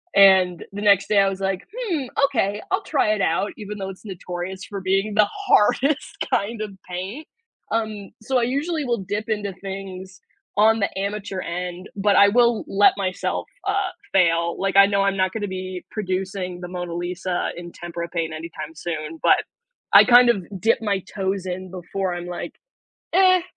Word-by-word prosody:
and 190 -3 +6
the 205 - -5
next 200 -2 +4
day 205 -2 +4
I 195 0 +4
was, 195 0 -5
like, 195 0 -1
"Hmm, 360 - -2 0.2
okay, 210 -7 0
I'll - - +1
try 215 - +1
it 205 - -1
out," 180 +5 +1
even 210 0 -7
though 195 -1 -4
it's 190 - -14
notorious 180 0 -6
for 200 -2 -6
being 195 +3 0
the 210 -1 +4 0.2
hardest 275 - +2 0.2
kind 215 +2 0
of 210 -2 -4 0.2
paint, 195 - -5 0.5
um, 215 -3 -2
so, 260 +3 0
I - - +1
usually 295 +5 -1
will 235 -6 -1
dip 210 +2 -3
into 205 -3 -2
things 190 -1 -7 0.4
on 220 +1 +5
the 200 - +1
amateur 200 -1 -3
end, 180 +2 -5
but 205 0 +2
I 200 0 +7
will 235 0 +3
let 205 +1 +5
myself, 185 -2 -2 0.2
uh, - - 0 0.2
fail. 170 -2 +3
Like, 195 0 -1
I 195 0 +8
know 200 -1 +1
I'm 195 0 +1
not 185 0 +2
gonna 210 -1 -3
be 185 -1 -6
producing 185 -2 -3
the 175 - -5
Mona 175 -1 -5
Lisa 175 +1 -2
in 175 0 -8
tempera 170 0 -6
paint 165 -2 -2
anytime 160 -1 -7
soon, 160 -1 -5
but - - +4 0.5
I - - +10
kind 245 0 +7
of 195 -5 -3 0.2
dip 225 +3 +3
my 200 -3 0
toes 190 -1 -1
in 185 0 -5
before 185 0 -3
I'm 175 0 -5
like, 175 -1 -6 0.6
"Eh, 370 0 +5
195 Hz, 180 wpm, -23 LUFS, 180-210 Hz, 0.6 s, I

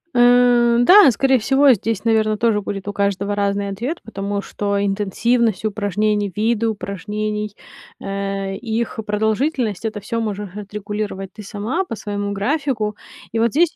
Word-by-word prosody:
Э, 245 -1 +5
да, 365 +3 +8
скорее 265 +3 +2
всего, 270 +3 +5
здесь, 220 -1 -2
наверно, 215 -1 +2
тоже 225 -2 +2
будет 195 0 -5
у 205 - -3
каждого 200 0 0
разный 200 0 0
ответ, 240 - -4
потому 200 -2 -3
что 200 -1 -2
интенсивность 215 +3 0
упражнений, 205 -1 0
виды 225 +1 +1
упражнений, 210 +1 -3 0.4
э, 195 0 -3
и 225 0 -2
их 225 - -4
продолжительность- 220 - 0
это 215 -1 -3
всё 230 +3 -3
можешь 205 -3 -4
отрегулировать 205 -2 -5
ты 215 - -10
сама, 215 - -2
по 230 - -5
своему 205 -1 -4
графику. 225 -1 -1 0.4
И 225 - -1
вот 230 +1 +3
здесь 335 +2 +3
210 Hz, 150 wpm, -20 LUFS, 200-235 Hz, 0.4 s, да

